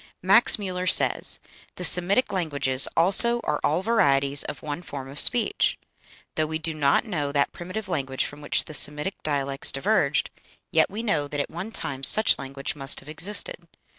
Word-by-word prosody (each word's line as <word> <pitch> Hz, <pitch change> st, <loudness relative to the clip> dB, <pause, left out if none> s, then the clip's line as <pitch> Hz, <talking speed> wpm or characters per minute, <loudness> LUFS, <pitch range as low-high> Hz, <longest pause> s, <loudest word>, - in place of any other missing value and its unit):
Max 195 Hz, +6 st, +5 dB
Müller 185 Hz, -3 st, -4 dB
says: -, -, +2 dB, 0.4 s
"The 180 Hz, -, -7 dB
Semitic 180 Hz, +8 st, +3 dB
languages 140 Hz, -7 st, -1 dB
also 200 Hz, +8 st, +6 dB
are 150 Hz, -, -2 dB
all 165 Hz, +5 st, 0 dB
varieties 140 Hz, -10 st, +2 dB
of 135 Hz, -, -8 dB
one 150 Hz, +2 st, -6 dB
form 140 Hz, -6 st, -9 dB
of 140 Hz, -, -5 dB
speech. 245 Hz, -, +2 dB, 0.6 s
Though 155 Hz, 0 st, -1 dB
we 160 Hz, 0 st, -4 dB
do 160 Hz, 0 st, -4 dB
not 145 Hz, -, +1 dB
know 150 Hz, -9 st, -4 dB
that 140 Hz, -1 st, 0 dB
primitive 185 Hz, +5 st, -8 dB
language 135 Hz, -7 st, -3 dB
from 145 Hz, +1 st, -8 dB
which 145 Hz, -, -1 dB
the 155 Hz, -, -10 dB
Semitic 150 Hz, +5 st, +3 dB
dialects 140 Hz, -2 st, -1 dB
diverged, 150 Hz, -1 st, -1 dB, 0.4 s
yet 160 Hz, -3 st, +2 dB
we 210 Hz, +4 st, -6 dB
know 155 Hz, -10 st, -1 dB
that 145 Hz, 0 st, -6 dB
at 145 Hz, -, -4 dB
one 185 Hz, +7 st, -7 dB
time 135 Hz, -10 st, -3 dB
such 215 Hz, +10 st, +3 dB
language 135 Hz, +2 st, -6 dB
must 135 Hz, -1 st, -2 dB
have 135 Hz, -, -13 dB
existed.... 205 Hz, -, -3 dB
155 Hz, 175 wpm, -24 LUFS, 140-190 Hz, 0.6 s, also